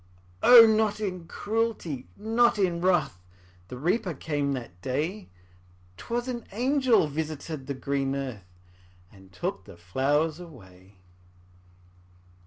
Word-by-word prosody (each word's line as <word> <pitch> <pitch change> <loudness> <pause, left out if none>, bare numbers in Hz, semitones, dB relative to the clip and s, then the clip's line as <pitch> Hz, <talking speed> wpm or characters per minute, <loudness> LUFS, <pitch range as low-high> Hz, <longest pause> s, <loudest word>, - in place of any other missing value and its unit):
O, 240 -2 +10
not 215 -1 +2
in 180 -5 -4
cruelty, 210 - -3
not 225 +2 +2
in 175 -4 0
wrath, 175 - +1 0.5
The 125 - -8
Reaper 180 - -1
came 145 -1 -2
that 115 -9 -7
day; 155 - -3 0.7
'Twas 240 - -4
an 240 -2 -4
angel 250 - +2
visited 155 -1 -5
the 140 - -3
green 135 0 -2
earth, 105 -10 -7 0.5
And 95 -2 -18
took 95 +1 -4
the 100 -4 -13
flowers 145 - 0
away. 95 - -14
155 Hz, 115 wpm, -27 LUFS, 130-215 Hz, 0.7 s, O